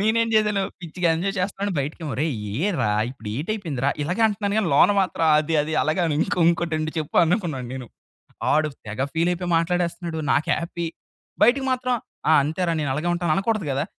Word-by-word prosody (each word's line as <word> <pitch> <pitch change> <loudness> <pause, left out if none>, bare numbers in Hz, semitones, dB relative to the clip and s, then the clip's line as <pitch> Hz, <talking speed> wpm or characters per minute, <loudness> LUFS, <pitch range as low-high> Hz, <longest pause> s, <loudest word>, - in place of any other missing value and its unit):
నేనేం 225 +2 +2
చేశాను 210 -2 +3 0.2
పిచ్చిగా 175 0 -2
ఎంజాయ్ 195 +4 -2
చేస్తున్నాను. 200 +2 -2
బయటకేమో 150 +3 -4
"ఒరేయ్ 150 +1 -1 0.2
ఏ 185 - +1
రా? 105 - +1 0.2
ఇప్పుడు 125 -5 -9
ఏటైపోయిందిరా?" 155 - -2
ఇలాగే 180 +9 -1
అంటున్నాను 205 -1 -1
గానీ 210 -5 +1
లోన 145 - +6
మాత్రం 185 -3 0
అది 155 +2 -1
అది 155 - -4
అలాగే 155 +4 0
అను 160 -3 0
"ఇంకో 175 - 0
ఇంకోటొండు 160 -2 0
చెప్పు" 155 -2 -4
అనుకున్నాను 165 - -1
నేను. 130 -2 -6 0.7
ఆడు 155 +1 +3 0.2
తెగ 110 +5 -3
ఫీల్ 165 +2 +2
అయిపోయి 175 0 -3
మాట్లాడేస్తున్నాడు. 170 0 -1
నాకు 150 - +1
హ్యాపీ. 170 +1 -4 0.6
బయటికి 260 +4 +4
మాత్రం 255 0 0 0.4
"ఆ! - - +7
అంతేరా 165 +4 -1
నేను 145 -3 -1
అలాగే 155 +5 -2
ఉంటాను" 175 -2 0
అనకూడదు 205 -2 0
గదా! 135 +1 0
170 Hz, 175 wpm, -23 LUFS, 155-195 Hz, 0.7 s, ఆ